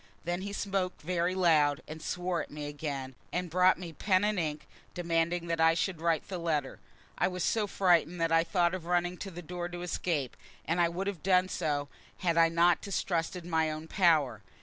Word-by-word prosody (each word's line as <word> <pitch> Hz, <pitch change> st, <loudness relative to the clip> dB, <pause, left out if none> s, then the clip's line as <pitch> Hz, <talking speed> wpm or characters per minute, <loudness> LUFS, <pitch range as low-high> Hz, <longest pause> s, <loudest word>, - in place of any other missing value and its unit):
Then 175 Hz, +2 st, -2 dB
he 200 Hz, +1 st, -5 dB
spoke 195 Hz, -2 st, -2 dB
very 175 Hz, +2 st, 0 dB
loud, 155 Hz, -6 st, +3 dB
and 155 Hz, +1 st, -8 dB
swore 180 Hz, +1 st, -2 dB
at -, -, -8 dB
me 150 Hz, 0 st, -6 dB
again, 145 Hz, -3 st, -5 dB, 0.2 s
and 180 Hz, -1 st, -2 dB
brought 185 Hz, +2 st, +4 dB
me 175 Hz, -3 st, -8 dB
pen 185 Hz, +4 st, +2 dB
and 210 Hz, -2 st, +1 dB
ink, 155 Hz, -2 st, -3 dB, 0.3 s
demanding 170 Hz, 0 st, 0 dB
that 165 Hz, -1 st, -1 dB
I 165 Hz, 0 st, +5 dB
should 170 Hz, -1 st, -1 dB
write 165 Hz, -2 st, +1 dB
the 185 Hz, -2 st, -4 dB
letter. 155 Hz, -5 st, -1 dB, 0.4 s
I -, -, +3 dB
was 180 Hz, -1 st, -3 dB
so 215 Hz, -2 st, +1 dB
frightened 180 Hz, -3 st, +2 dB
that 165 Hz, 0 st, +1 dB
I 165 Hz, 0 st, +5 dB
thought 175 Hz, 0 st, +1 dB
of 175 Hz, -3 st, -5 dB
running 175 Hz, 0 st, +1 dB
to 195 Hz, -, -6 dB
the 175 Hz, -1 st, -9 dB
door 175 Hz, +1 st, -5 dB
to 175 Hz, 0 st, -6 dB
escape, 160 Hz, -6 st, -2 dB, 0.3 s
and 170 Hz, +2 st, +1 dB
I 170 Hz, -, +4 dB
would 180 Hz, +3 st, -3 dB
have 200 Hz, -5 st, -4 dB
done 185 Hz, 0 st, +3 dB
so 145 Hz, -5 st, -1 dB, 0.3 s
had 170 Hz, -2 st, 0 dB
I 165 Hz, 0 st, +5 dB
not 170 Hz, +1 st, +3 dB
distrusted 175 Hz, -3 st, -2 dB
my 160 Hz, -2 st, +1 dB
own 155 Hz, +1 st, -5 dB
power. 155 Hz, -, +3 dB
170 Hz, 205 wpm, -30 LUFS, 160-180 Hz, 0.4 s, I